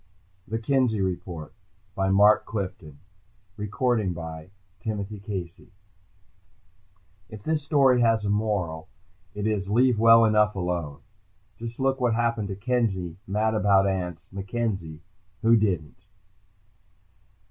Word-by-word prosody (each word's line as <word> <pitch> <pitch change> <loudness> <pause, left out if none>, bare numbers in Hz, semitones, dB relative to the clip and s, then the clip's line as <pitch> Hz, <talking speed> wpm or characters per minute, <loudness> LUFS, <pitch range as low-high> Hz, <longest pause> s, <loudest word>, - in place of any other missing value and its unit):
THE 110 - -2
Kenzie 120 -2 +1
REPORT 90 -4 -4 0.4
By 95 0 0
Mark 105 +2 +5
Clifton 90 -8 -6 0.6
Illustrated 105 -2 0
by 80 0 -8 0.3
Kelly 105 +1 -3
Freas 95 -4 -7 1.6
_If 110 0 -10
this 155 -1 0
story 135 -4 +3
has 115 -3 +2
a - - 0
moral, 100 -7 -1 0.5
it 105 0 -3
is: 105 -3 -1
"Leave 120 +1 +3
well 115 0 +7
enough 105 -1 +3
alone." 85 -6 -3 0.6
Just 115 +1 -7
look 135 0 0
what 120 -2 +2
happened 115 -3 0
to 95 - -4
Kenzie 100 -6 -1
"mad 105 +3 0
about 100 -2 +3
ants" 90 -3 -3
MacKenzie, 95 -5 -4 0.4
who 115 +1 +6
didn't.... 90 -5 -1
105 Hz, 115 wpm, -26 LUFS, 90-115 Hz, 1.6 s, well